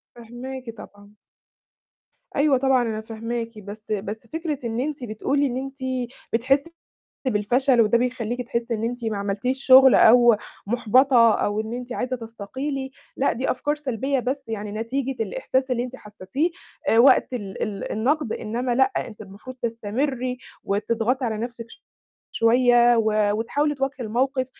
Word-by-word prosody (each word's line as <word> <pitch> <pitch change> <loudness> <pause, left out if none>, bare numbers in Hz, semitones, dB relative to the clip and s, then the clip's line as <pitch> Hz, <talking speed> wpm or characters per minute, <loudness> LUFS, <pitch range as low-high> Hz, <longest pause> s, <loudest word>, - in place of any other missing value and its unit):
فاهماكِ 240 +2 -8
طبعًا. 205 -1 -14 1.2
أيوه 285 -2 +4
طبعًا 265 -1 +3
أنا 220 -2 -2
فاهماكِ، 230 +1 -5
بس 210 +2 -8
بس 210 +3 -4
فكرة 320 -3 -3
إن 230 +1 -2
أنتِ 280 -2 -3
بتقولي 275 +6 0
إن 250 -1 -3
أنتِ 270 +1 -5 0.6
بتحسّي 270 +7 +1 0.6
بالفشل، 245 +3 +2
وده 230 +1 +4
بيخلّيكِ 245 -1 -2
تحسّي 235 0 -2
إن 220 +1 -3
أنتِ 240 0 -3
ما 220 -2 -1
عملتيش 205 +7 -2
شغل 265 0 +8
أو 240 0 +7 0.3
محبطة 240 +1 +4
أو 205 +1 0
إن 220 +1 -5
أنتِ 250 0 -6
عايزة 255 0 -2
تستقيلي، 260 +5 -5 0.3
لأ 275 - +2
دي 255 +3 -1
أفكار 290 +4 -1
سلبية 270 -1 -1
بس 270 +3 -2
يعني 210 -2 -4
نتيجة 250 +3 -2
الإحساس 260 - -1
اللي 245 0 0
أنتِ 255 +1 -8
حسّيتيه 210 - -3 0.5
وقت 260 +4 +6
ال 200 -5 -5
ال 200 -2 -3
النقد، 255 +3 0
إنما 240 +3 -2
لأ، 265 +1 +3
أنتِ 215 -2 -4
المفروض 215 +6 -10
تستمري 245 +3 -2 0.3
وتضغطي 230 +5 0
على 220 -2 -2
نفْسِك 235 0 -5 0.7
شوية، 240 0 +4
و 215 -2 +2
وتحاولي 290 +6 0
تواجهي 270 0 -2
الموقف، 255 +3 0
240 Hz, 145 wpm, -23 LUFS, 220-265 Hz, 1.2 s, شغل